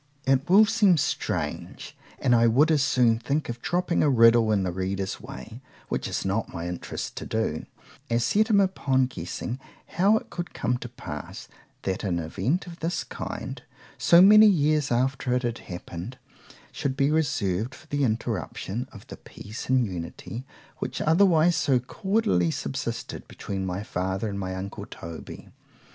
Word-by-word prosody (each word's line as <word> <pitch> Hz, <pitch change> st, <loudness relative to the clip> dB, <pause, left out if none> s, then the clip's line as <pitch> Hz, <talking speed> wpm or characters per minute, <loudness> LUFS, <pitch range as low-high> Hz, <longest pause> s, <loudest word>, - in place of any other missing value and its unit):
It 135 Hz, +2 st, +2 dB
will 205 Hz, +4 st, +8 dB
seem 210 Hz, -5 st, +4 dB
strange,——and 135 Hz, -2 st, -2 dB
I 115 Hz, 0 st, +5 dB
would 140 Hz, +8 st, +4 dB
as 150 Hz, -3 st, +3 dB
soon 120 Hz, -4 st, +3 dB
think 140 Hz, +5 st, -1 dB
of 120 Hz, 0 st, -5 dB
dropping 175 Hz, 0 st, 0 dB
a 150 Hz, -, +4 dB
riddle 115 Hz, -3 st, +5 dB
in 100 Hz, -3 st, +2 dB
the 90 Hz, -, -1 dB
reader's 95 Hz, +1 st, -3 dB
way, 120 Hz, -1 st, -9 dB, 0.3 s
which -, -, -2 dB
is -, -, -3 dB
not 100 Hz, +4 st, -1 dB
my 85 Hz, 0 st, -5 dB
interest 90 Hz, 0 st, -5 dB
to -, -, -5 dB
do, 110 Hz, -9 st, -2 dB, 0.4 s
as 115 Hz, 0 st, +1 dB
set 215 Hz, -, +3 dB
him 205 Hz, -2 st, +5 dB
upon 140 Hz, -9 st, +2 dB
guessing 125 Hz, 0 st, -5 dB, 0.3 s
how 200 Hz, +5 st, +3 dB
it -, -, -8 dB
could 175 Hz, -1 st, -6 dB
come 125 Hz, +1 st, 0 dB
to 120 Hz, -, -7 dB
pass, 120 Hz, -, -8 dB, 0.4 s
that 95 Hz, +2 st, -2 dB
an 90 Hz, -4 st, 0 dB
event 95 Hz, -, -1 dB
of 175 Hz, -1 st, -10 dB
this 165 Hz, +1 st, -2 dB
kind, -, -, -6 dB, 0.4 s
so 170 Hz, +1 st, +7 dB
many 215 Hz, +2 st, +9 dB
years 150 Hz, -7 st, +2 dB
after 130 Hz, +1 st, +1 dB
it 125 Hz, -, 0 dB
had 120 Hz, -1 st, -2 dB
happened, 90 Hz, +6 st, -8 dB, 0.5 s
should 135 Hz, -1 st, -3 dB
be 140 Hz, 0 st, +3 dB
reserved 130 Hz, -, 0 dB
for -, -, -16 dB
the 145 Hz, -2 st, -1 dB
interruption 110 Hz, -, -2 dB
of -, -, -12 dB
the -, -, -10 dB
peace 110 Hz, +5 st, -9 dB
and 130 Hz, -2 st, +4 dB
unity, 95 Hz, +6 st, -6 dB, 0.3 s
which -, -, -4 dB
otherwise 170 Hz, 0 st, +4 dB
so 135 Hz, -3 st, +2 dB
cordially 125 Hz, -, +1 dB
subsisted, 70 Hz, -3 st, -4 dB
between 95 Hz, -1 st, -5 dB
my 90 Hz, +2 st, -3 dB
father 95 Hz, +1 st, -2 dB
and 100 Hz, -1 st, -4 dB
my 95 Hz, -1 st, -3 dB
uncle 95 Hz, +1 st, -6 dB
_Toby. 85 Hz, -1 st, -9 dB
125 Hz, 165 wpm, -26 LUFS, 100-155 Hz, 0.5 s, many